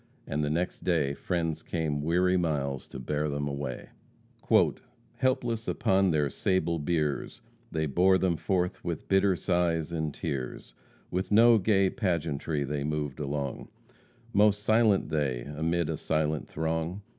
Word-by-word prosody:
And 75 Hz, +2 st, -2 dB
the 75 Hz, -, 0 dB
next 85 Hz, +4 st, -2 dB
day 75 Hz, -6 st, +1 dB
friends 80 Hz, 0 st, -2 dB
came 80 Hz, -4 st, -2 dB
weary 90 Hz, +4 st, +2 dB
miles 70 Hz, -6 st, -1 dB
to -, -, -9 dB
bear 75 Hz, +4 st, -2 dB
them 70 Hz, 0 st, -2 dB
away. 70 Hz, -2 st, -5 dB, 1.3 s
"Helpless 120 Hz, -3 st, 0 dB
upon 95 Hz, 0 st, +2 dB
their 75 Hz, -3 st, +2 dB
sable 85 Hz, +1 st, 0 dB
biers, 75 Hz, -2 st, -1 dB, 0.3 s
They 80 Hz, -1 st, 0 dB
bore 90 Hz, +6 st, +4 dB
them 95 Hz, -2 st, +1 dB
forth 90 Hz, +3 st, -1 dB
with 85 Hz, -3 st, -4 dB
bitter 95 Hz, -1 st, +3 dB
sighs 85 Hz, -3 st, 0 dB
and 80 Hz, -2 st, -2 dB
tears, 70 Hz, -5 st, -5 dB, 0.4 s
With 90 Hz, +1 st, -2 dB
no 115 Hz, +2 st, +7 dB
gay 95 Hz, -1 st, +3 dB
pageantry 80 Hz, -, -1 dB
they 70 Hz, +1 st, -3 dB
moved 75 Hz, -2 st, -3 dB
along, 70 Hz, -2 st, -3 dB, 0.7 s
Most 105 Hz, 0 st, +4 dB
silent 110 Hz, -4 st, +3 dB
they, 70 Hz, -6 st, 0 dB
amid 80 Hz, +5 st, -1 dB
a 80 Hz, -1 st, -2 dB
silent 75 Hz, 0 st, -1 dB
throng. 80 Hz, +4 st, -2 dB
80 Hz, 140 wpm, -28 LUFS, 75-95 Hz, 1.3 s, no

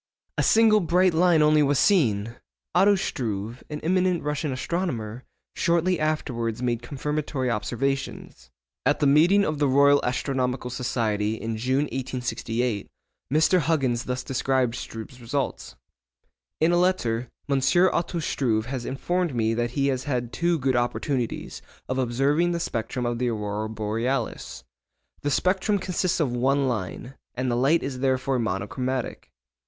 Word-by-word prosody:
A -, -, +1 dB
single 220 Hz, -1 st, +5 dB
bright 180 Hz, 0 st, +3 dB
line 165 Hz, -1 st, +4 dB
only 150 Hz, 0 st, +5 dB
was 145 Hz, -1 st, +2 dB
seen! 115 Hz, -, +2 dB, 0.4 s
Otto 200 Hz, +3 st, +5 dB
Struve, 115 Hz, -, -3 dB
an 150 Hz, -1 st, -4 dB
eminent 180 Hz, 0 st, +1 dB
Russian 150 Hz, 0 st, -2 dB
astronomer, 130 Hz, -, -3 dB, 0.3 s
shortly 170 Hz, +1 st, +1 dB
afterwards 125 Hz, -7 st, -1 dB
made 120 Hz, -2 st, -1 dB
confirmatory 140 Hz, -1 st, -2 dB
observations. 120 Hz, -, -3 dB, 0.3 s
At -, -, +2 dB
the -, -, +2 dB
meeting 170 Hz, +8 st, +5 dB
of 155 Hz, -2 st, -2 dB
the 145 Hz, -, +3 dB
Royal 140 Hz, +1 st, +5 dB
Astronomical 125 Hz, -1 st, -1 dB
Society 110 Hz, -4 st, -1 dB
in 115 Hz, 0 st, -4 dB
June, 130 Hz, +5 st, +1 dB
1868, 125 Hz, -4 st, -3 dB, 0.4 s
Mr. 160 Hz, +5 st, +4 dB
Huggins 135 Hz, -7 st, 0 dB
thus 125 Hz, 0 st, -3 dB
described 130 Hz, -2 st, 0 dB
Struve's 120 Hz, +2 st, -8 dB
results:—'In 70 Hz, -, -5 dB
a 175 Hz, -, +3 dB
letter, 125 Hz, -11 st, +1 dB, 0.2 s
M. 140 Hz, -2 st, +1 dB, 0.3 s
Otto 170 Hz, 0 st, -1 dB
Struve 120 Hz, -8 st, 0 dB
has 125 Hz, -1 st, -4 dB
informed 175 Hz, +3 st, -1 dB
me 115 Hz, -1 st, +1 dB
that 120 Hz, +1 st, -1 dB
he 140 Hz, 0 st, +2 dB
has 130 Hz, 0 st, -2 dB
had 125 Hz, -4 st, -2 dB
two 170 Hz, 0 st, +1 dB
good 130 Hz, -3 st, 0 dB
opportunities 120 Hz, 0 st, -2 dB, 0.3 s
of 130 Hz, +1 st, -2 dB
observing 140 Hz, +8 st, +1 dB
the 170 Hz, -, -1 dB
spectrum 125 Hz, -3 st, -3 dB
of 120 Hz, 0 st, -1 dB
the 125 Hz, -1 st, +1 dB
aurora 105 Hz, -1 st, -3 dB
borealis. 110 Hz, -, -3 dB, 0.6 s
The 145 Hz, -, -1 dB
spectrum 190 Hz, +7 st, +1 dB
consists 185 Hz, -1 st, -1 dB
of 145 Hz, -6 st, +1 dB
one 135 Hz, +3 st, +2 dB
line, 120 Hz, +2 st, -4 dB, 0.2 s
and 130 Hz, 0 st, -1 dB
the -, -, +1 dB
light 140 Hz, +7 st, +3 dB
is 135 Hz, -2 st, -4 dB
therefore 130 Hz, 0 st, +1 dB
monochromatic. 115 Hz, +5 st, -3 dB
130 Hz, 140 wpm, -25 LUFS, 120-155 Hz, 0.6 s, single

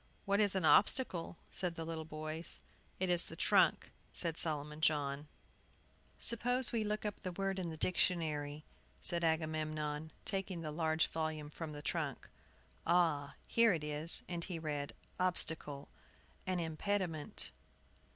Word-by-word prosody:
"What 200 Hz, +1 st, +2 dB
is 205 Hz, -2 st, +3 dB
an 185 Hz, -4 st, +1 dB
obstacle?" 180 Hz, -3 st, +3 dB, 0.2 s
asked 180 Hz, -2 st, -2 dB
the 165 Hz, -, -4 dB
little 160 Hz, -1 st, -4 dB
boys. 155 Hz, +1 st, -6 dB, 0.4 s
"It 185 Hz, -, +1 dB
is 175 Hz, -1 st, +1 dB
the 165 Hz, -, -9 dB
trunk," 185 Hz, -1 st, +3 dB, 0.2 s
said 165 Hz, -2 st, -1 dB
Solomon 150 Hz, -1 st, -1 dB
John. 145 Hz, -1 st, +1 dB, 0.9 s
"Suppose 245 Hz, +2 st, +3 dB
we 230 Hz, -2 st, +1 dB
look 210 Hz, 0 st, -2 dB
out 210 Hz, -, -2 dB
the 185 Hz, -, -3 dB
word 195 Hz, +1 st, -1 dB
in 175 Hz, -2 st, -2 dB
the 160 Hz, -, -6 dB
dictionary," 155 Hz, -5 st, +1 dB, 0.3 s
said 170 Hz, 0 st, +4 dB
Agamemnon, 155 Hz, -1 st, -1 dB
taking 190 Hz, -3 st, -2 dB
the 155 Hz, -2 st, -4 dB
large 160 Hz, 0 st, +2 dB
volume 155 Hz, -2 st, -3 dB
from 155 Hz, -1 st, -6 dB
the 145 Hz, 0 st, -7 dB
trunk. 155 Hz, -7 st, -2 dB, 0.6 s
"Ah, 165 Hz, -5 st, +2 dB
here 230 Hz, -3 st, +4 dB
it 160 Hz, -3 st, -2 dB
is 150 Hz, +2 st, +2 dB
" -, -, -31 dB
And 170 Hz, -1 st, -3 dB
he 180 Hz, -2 st, -4 dB
read: 150 Hz, -3 st, -3 dB, 0.2 s
"OBSTACLE, 160 Hz, -5 st, +1 dB, 0.6 s
an 185 Hz, -1 st, 0 dB
impediment." 165 Hz, -1 st, -1 dB
165 Hz, 145 wpm, -36 LUFS, 155-185 Hz, 0.9 s, said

